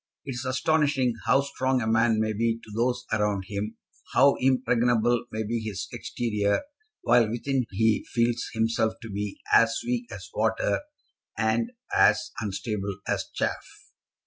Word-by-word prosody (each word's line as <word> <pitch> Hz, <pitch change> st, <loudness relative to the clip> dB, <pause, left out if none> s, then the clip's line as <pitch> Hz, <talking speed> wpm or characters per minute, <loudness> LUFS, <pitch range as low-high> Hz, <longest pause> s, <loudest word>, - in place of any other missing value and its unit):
It 135 Hz, -, -4 dB
is 125 Hz, +1 st, -5 dB
astonishing 140 Hz, -1 st, +2 dB
how 135 Hz, -, +5 dB
strong 130 Hz, -2 st, 0 dB
a 115 Hz, -, -2 dB
man 110 Hz, 0 st, +3 dB
may 110 Hz, 0 st, 0 dB
be 115 Hz, +2 st, 0 dB
to 110 Hz, -, -13 dB
those 125 Hz, +2 st, 0 dB
around 105 Hz, -2 st, +1 dB
him, 105 Hz, +1 st, -4 dB, 0.4 s
how 140 Hz, +2 st, +6 dB
impregnable 120 Hz, -2 st, +2 dB
may 110 Hz, +1 st, -2 dB
be 115 Hz, +2 st, -2 dB
his 100 Hz, -4 st, -4 dB
exterior, 105 Hz, -4 st, -1 dB, 0.4 s
while 120 Hz, -2 st, +4 dB
within 120 Hz, +2 st, -1 dB
he 110 Hz, +2 st, +2 dB
feels 120 Hz, 0 st, +1 dB
himself 110 Hz, -1 st, +1 dB
to 115 Hz, -, -7 dB
be 100 Hz, 0 st, -4 dB
as 115 Hz, 0 st, +5 dB
weak 245 Hz, -1 st, -2 dB
as -, -, -8 dB
water, -, -, +1 dB, 0.6 s
and 110 Hz, -, 0 dB, 0.2 s
as 155 Hz, 0 st, +4 dB
unstable 100 Hz, -1 st, -3 dB
as -, -, 0 dB
chaff. -, -, -1 dB
115 Hz, 145 wpm, -26 LUFS, 110-125 Hz, 0.6 s, how